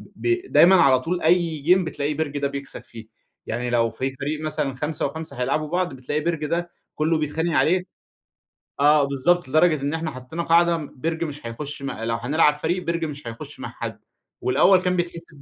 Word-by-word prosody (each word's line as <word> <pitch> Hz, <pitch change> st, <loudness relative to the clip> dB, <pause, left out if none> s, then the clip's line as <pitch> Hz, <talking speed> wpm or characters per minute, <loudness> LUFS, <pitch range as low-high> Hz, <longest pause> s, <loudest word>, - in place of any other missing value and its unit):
ب 360 Hz, +2 st, -1 dB
دايمًا 185 Hz, +3 st, +7 dB
على 135 Hz, -8 st, +5 dB
طول 175 Hz, +6 st, -2 dB
أي 165 Hz, -1 st, +2 dB
جيم 180 Hz, +6 st, +4 dB
بتلاقي 150 Hz, -2 st, -2 dB
بِرج 145 Hz, -1 st, -3 dB
ده 140 Hz, -, 0 dB
بيكسب 140 Hz, 0 st, -7 dB
فيه، 115 Hz, -2 st, -12 dB, 0.4 s
يعني 120 Hz, +2 st, -3 dB
لو 115 Hz, -1 st, +2 dB
في 130 Hz, +4 st, -3 dB
فريق 150 Hz, +3 st, -4 dB
مثلًا 150 Hz, -3 st, -2 dB
5 150 Hz, +3 st, -2 dB
و5 140 Hz, -2 st, -6 dB
هيلاعبوا 150 Hz, +4 st, 0 dB
بعض، 175 Hz, -2 st, -1 dB
بتلاقي 135 Hz, +4 st, -3 dB
بِرج 165 Hz, -2 st, -1 dB
ده 170 Hz, +2 st, -2 dB, 0.2 s
كلّه 160 Hz, +1 st, +1 dB
بيتخانق 160 Hz, +2 st, -1 dB
عليه، 180 Hz, +2 st, +3 dB, 1.0 s
آه 150 Hz, +1 st, +5 dB
بالضبط، 140 Hz, +6 st, +1 dB
لدرجة 155 Hz, 0 st, +3 dB
إن 145 Hz, +2 st, -1 dB
إحنا 160 Hz, -1 st, -2 dB
حطّينا 130 Hz, +6 st, -6 dB
قاعدة 170 Hz, 0 st, +4 dB
م 150 Hz, -3 st, -7 dB
بِرج 160 Hz, +4 st, -2 dB
مش 145 Hz, -5 st, -6 dB
هيخش 145 Hz, +5 st, -7 dB
م 140 Hz, -, -3 dB
لو 115 Hz, +1 st, -3 dB
هنلعب 150 Hz, +5 st, +3 dB
فريق 175 Hz, +4 st, -2 dB
بِرج 170 Hz, -1 st, -1 dB
مش 145 Hz, -4 st, -7 dB
هيخش 115 Hz, 0 st, -8 dB
مع -, -, -5 dB
حد، -, -, -6 dB, 0.4 s
والأول 180 Hz, +9 st, +4 dB
كان 180 Hz, 0 st, 0 dB
بيتحسب 170 Hz, -4 st, -5 dB
155 Hz, 190 wpm, -23 LUFS, 140-170 Hz, 1.0 s, دايمًا